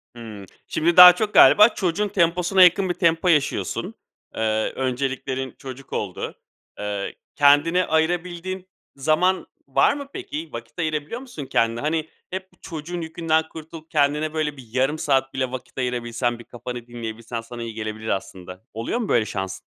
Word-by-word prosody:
Hımm, 110 -4 -9 0.2
şimdi 170 +2 0
daha 180 0 +12
çok 210 +2 -2
galiba 210 +2 +8
çocuğun 195 -1 -1
temposuna 180 0 +3
yakın 185 +2 +4
bir 175 - +1
tempo 165 0 +1
yaşıyorsun. 150 -5 0 0.4
Eee, 110 -1 0
önceliklerin 130 0 -3
çocuk 135 0 -10
oldu. - - -4 0.4
Eee, 100 -1 -4 0.2
kendine 145 +5 +4
ayırabildiğin 175 +3 -1 0.3
zaman 155 +7 +1 0.2
var - - +3
mı, 285 -1 -7
peki? 330 -4 -6
Vakit - - -9
ayırabiliyor 155 +6 -2
musun 240 - -8
kendine? 115 -2 +1
Hani, 155 +1 -1 0.2
hep 190 0 -6
bu - - -26
çocuğun 170 +1 -6
yükünden 160 -1 0
kurtulup 160 0 -11
kendine, 150 +1 +1
böyle, 150 -2 -2
bir 125 -3 -12
yarım 130 +5 +1
saat 135 -3 +1
bile 130 -1 -2
vakit 130 -1 -8
ayırabilsen, 120 -1 -2
bir 120 - -10
kafanı 120 0 -8
dinleyebilsen 115 0 -6
sana 120 +1 -8
iyi 115 -1 -6
gelebilir 110 0 -6
aslında. 95 -1 -5
Oluyor 115 - -2
mu 225 - -2
böyle 115 -2 +3
şans? 95 -2 -4
150 Hz, 155 wpm, -23 LUFS, 120-175 Hz, 0.4 s, daha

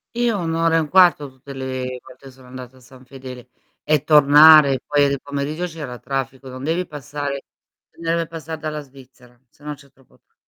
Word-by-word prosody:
Io 235 -4 0
1 165 -1 -3
ora 165 0 +2
e - - +3
1/4 160 -3 +3
tutte 130 +1 -13
le 130 -1 -5
volte 130 +2 -17
che 135 - -11
sono 130 0 -18
andata 130 0 -11
a - - -18
San 130 +1 -18
Fedele, 125 -1 -11 0.3
e 150 -2 +1
tornare, 150 -2 +7
poi 145 -1 +2
di 140 -1 -2
pomeriggio 145 +4 -4
c'era 150 -7 -8
traffico, 135 0 -5
non 130 +1 -9
devi 170 +4 -1
passare 145 -1 -6 0.5
non 165 0 -4
deve 170 0 -1
passar 165 -1 -7
dalla 155 -1 -5
Svizzera, 130 -3 -19
se 145 - -26
no 150 0 -5
c'è 140 -1 -21
troppo 135 -1 -27
tra - - -49
140 Hz, 195 wpm, -20 LUFS, 130-155 Hz, 0.5 s, tornare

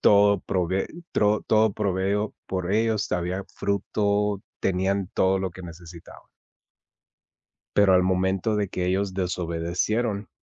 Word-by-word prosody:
todo 100 -1 +5
prove 95 +1 -1 0.3
tro 105 0 +2
todo 110 -1 +4
provisto 100 +1 -1
por 95 0 -2
ellos, 110 0 +1
había 90 +2 -1
fruto, 100 0 0 0.2
tenían 95 0 0
todo 95 0 +3
lo 95 -1 -2
que 95 +2 -11
necesitaban 85 0 -12 1.5
pero 100 -2 +5
al 90 - +4
momento 95 +3 +1
de 105 -2 -1
que 90 -1 -2
ellos 95 +1 0
desobedecieron 90 +5 -1
95 Hz, 120 wpm, -25 LUFS, 90-105 Hz, 1.5 s, todo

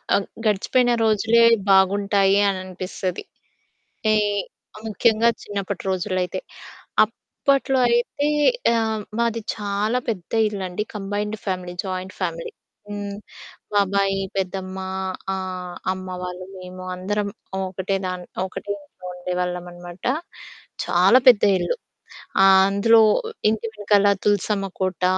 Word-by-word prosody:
అ - - +5 0.3
గడిచిపోయిన 240 +4 +2
రోజులే 225 +2 +4 0.3
బాగుంటాయి 195 +1 +4
అననిపిస్తది. 185 -1 -4 0.7
అంటే, 215 -1 +1 0.7
ముఖ్యంగా 220 +1 +3
చిన్నప్పటి 200 -2 -4
రోజుల్లో 185 0 -1
అయితే. 180 - -4 0.6
అప్పట్లో 270 +4 0
అయితే 240 +5 +1 0.5
ఆహ్, 220 -1 0 0.2
మాది 230 -1 0
చాలా 210 +3 -1
పెద్ద 185 -7 -4 0.2
ఇల్లండి, 195 -1 -4
కంబైన్డ్ 210 +1 -3
ఫ్యామిలీ, 180 -2 -3
జాయింట్ 185 0 -4
ఫ్యామిలీ. 165 -2 -3 0.4
హ్మ్, 205 -1 -5 0.6
బాబాయి, 195 -1 +2 0.2
పెద్దమ్మ, 190 0 -3 0.6
ఆహ్, 185 -1 -5 0.2
అమ్మ 185 0 -8
వాళ్ళు, 180 0 -6
మేము 185 0 -9
అందరం 205 +3 -2 0.4
ఒకటే 190 +1 -2
దాన్ 180 -1 -4 0.2
ఒకటే 200 +2 -5
ఇంట్లో 185 -1 -14
ఉండేవాళ్ళమన్నమాట. 180 0 -5 0.8
చాలా 185 +7 +5
పెద్ద 235 -5 +7 0.2
ఇల్లు. - - -1 0.7
ఆ - - +8 0.2
అందులో 200 +3 +5 0.5
ఇంటి 220 +1 -1
వెనకాల 205 -1 +3 0.2
తులసమ్మ 205 0 +1
కోట, 185 -1 -2
195 Hz, 100 wpm, -23 LUFS, 185-210 Hz, 0.8 s, ఆ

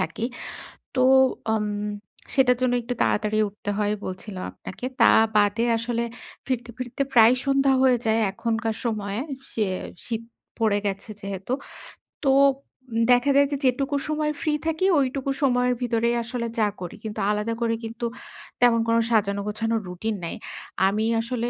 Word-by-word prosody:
থাকি। 160 +8 -2 0.7
তো 255 - +2 0.5
আম 215 -1 0 0.7
সেটার 250 -2 +4
জন্য 250 -1 +2
একটু 245 +1 -3
তাড়াতাড়ি 215 0 +1
উঠতে 205 0 -7
হয় 210 0 +1
বলছিলাম 185 0 -6
আপনাকে। 245 - -8 0.2
তা - - +8 0.3
বাদে 210 +2 +3
আসলে 235 +1 -1 0.4
ফিরতে, 245 -2 -2
ফিরতে 255 +2 -4
প্রায় 230 +1 +7
সন্ধ্যা 275 0 +3
হয়ে 255 -2 +5
যায় 220 0 +3
এখনকার 225 +1 -2
সময়ে 210 -2 -2 0.3
সে 215 -2 0 0.4
শীত 230 -1 -3 0.4
পড়ে 215 -2 +3
গেছে 200 +2 -3
যেহেতু। 195 +4 -4 0.7
তো 270 - +4 0.6
উম 230 +1 0
দেখা 245 +3 +4
যায় 280 0 +5
যে 285 - 0
যেটুকু 275 +3 +1
সময় 305 0 0
ফ্রি 305 -2 +1
থাকি 325 +3 0
ঐটুকু 270 0 0
সময়ের 250 -2 +3
ভিতরেই 235 0 +1
আসলে 235 0 -3
যা 210 - +4
করি। 175 - -6
কিন্তু 215 0 -5
আলাদা 210 +2 -1
করে 230 -1 +1
কিন্তু 230 +1 -5 0.6
তেমন 235 -2 +5
কোন 230 0 +3
সাজানো 200 -3 +2
গোছানো 225 +2 -1
রুটিন 210 +5 -3
নাই। 165 - -4 0.5
আমি 215 +3 0 0.2
আসলে 240 0 -2
230 Hz, 150 wpm, -24 LUFS, 215-250 Hz, 0.7 s, তা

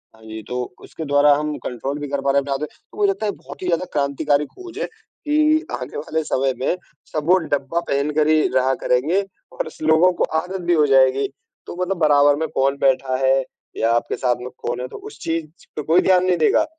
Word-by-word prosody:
हाँ 110 - -21
जी, 110 0 -7
तो 125 +3 -3 0.2
उसके 160 - -8
द्वारा 145 0 +5
हम 150 0 -2
कंट्रोल 135 +4 -4
भी 145 - -4
कर 140 -1 -2
पा 140 0 +1
रहे 140 - +3
थे 140 0 -6
आद 135 - -1
तो 150 - -11
मुझे 410 -1 +3
लगता 380 - -2
है 205 - +1
बहुत - - -12
ही 185 - -3
ज़्यादा 175 +1 +1
क्रांतिकारी 145 +1 +1
खोज 365 - -12
है - - 0 0.4
कि 310 +1 +3
आने 125 - -5
वाले 155 +1 -2
समय 135 -2 0
में, 135 - 0 0.4
सब 155 -2 -2
वो 185 - +7 0.2
डब्बा 140 +4 0
पहनकर 150 +2 +1
ही 155 -1 +4
रहा 130 +1 +3
करेंगे 150 +11 +2 0.3
और - - -3
इस - - -13
लोगों 160 +3 +5
को - - +5 0.2
आदत 185 +3 -5
भी 175 - +5
हो 150 -2 +4
जाएगी। 135 0 +4 0.4
तो - - -8
मतलब 190 +1 -1
बराबर 145 -2 +5
में 160 +2 -2
कौन 135 +1 +2
बैठा 130 -1 +1
है 135 +1 +4 0.4
या 115 +1 +2
आपके 120 0 0
साथ 125 -2 +1
में 125 - -6
कौन 120 +1 -3
है, 125 - -4
तो - - -9
उस 425 +1 -11
चीज 165 -1 -4
पे 150 - -2
कोई 165 +5 +4
ध्यान 185 -1 +4
नहीं 180 -1 +2
देगा, 155 - +3
145 Hz, 230 wpm, -21 LUFS, 135-170 Hz, 0.4 s, वो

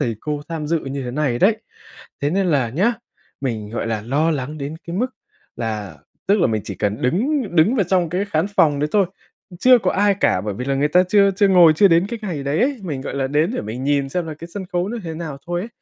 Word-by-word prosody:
thầy 115 -2 -1
cô 150 -1 -3
tham 160 -3 -4
dự 165 +2 +1
như 135 -1 -5
thế 125 - -4
này 130 -2 -1
đấy, 210 - +4 0.6
thế 145 - 0
nên 190 +2 +1
là 140 -8 +2
nhá, 190 - +2 0.5
mình, 110 -6 -3
gọi 115 - -3
là, 110 -2 -2
lo 145 +8 +1
lắng 150 0 -3
đến 145 +2 -5
cái 170 +1 -4
mức 250 +4 0 0.5
là, 105 -8 -4 0.3
tức 200 0 +3
là - - +4
mình 110 -3 -1
chỉ - - -6
cần 105 +1 -2
đứng 250 - +1
đứng 200 +11 +4
vào 200 - +2
trong 180 -1 +1
cái 180 +5 -1
khán 170 -3 0
phòng 145 -3 +4
đấy 150 - 0
thôi, 200 -3 +3 0.5
chưa 250 +4 +6
có 185 -4 0
ai 205 0 +3
cả. 90 - +3
Bởi 105 0 -4
vì 125 - -5
là 135 +1 0
người 145 +2 +1
ta 180 +4 +5
chưa 200 0 +5
chưa 200 0 +4
ngồi, 175 -4 +7
chưa 200 +4 +6
đến 170 +2 +3
cái 235 0 -4
ngày 170 -9 -4
đấy 140 +3 -1
ấy, 270 +1 +1
mình, 150 -8 -4
gọi - - -5
là, 135 -1 0
đến 150 +6 +1
để - - -2
mình 115 +5 -5
nhìn 140 -1 +1
xem 175 +4 -2
là 155 - -5
cái 165 +3 -10
sân 195 -2 -5
khấu 175 +1 0
nó 235 +2 -4
thế 165 -1 -5
nào 155 -4 -6
thôi 175 0 -2
ấy, 210 - -6
155 Hz, 265 wpm, -20 LUFS, 135-190 Hz, 0.6 s, ngồi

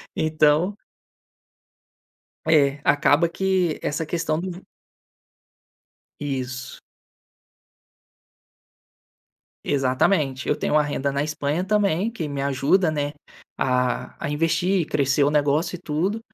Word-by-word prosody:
Então 155 +4 +2 1.7
É, 145 -3 +3
acaba 145 +3 +3
que 185 -2 0
essa 155 +2 -2
questão 160 -1 -1
do 180 0 -7 1.6
Isso. 130 -2 -4 2.9
Exatamente, 135 +1 +1
eu - - +2
tenho - - 0
a 150 - +5
renda 140 -1 -2
na 140 +1 -1
Espanha 150 +2 -2
também 205 0 +1
que 170 -10 -5
me 140 -1 -4
ajuda, 140 +6 +2
né, 145 -1 -2 0.4
a 125 0 0
a - - -1
investir 165 +5 +1
e 165 - 0
crescer 140 0 +2
o 145 - +2
negócio 150 +3 +1
e - - -14
tudo. 180 +8 -1
150 Hz, 105 wpm, -23 LUFS, 140-175 Hz, 2.9 s, a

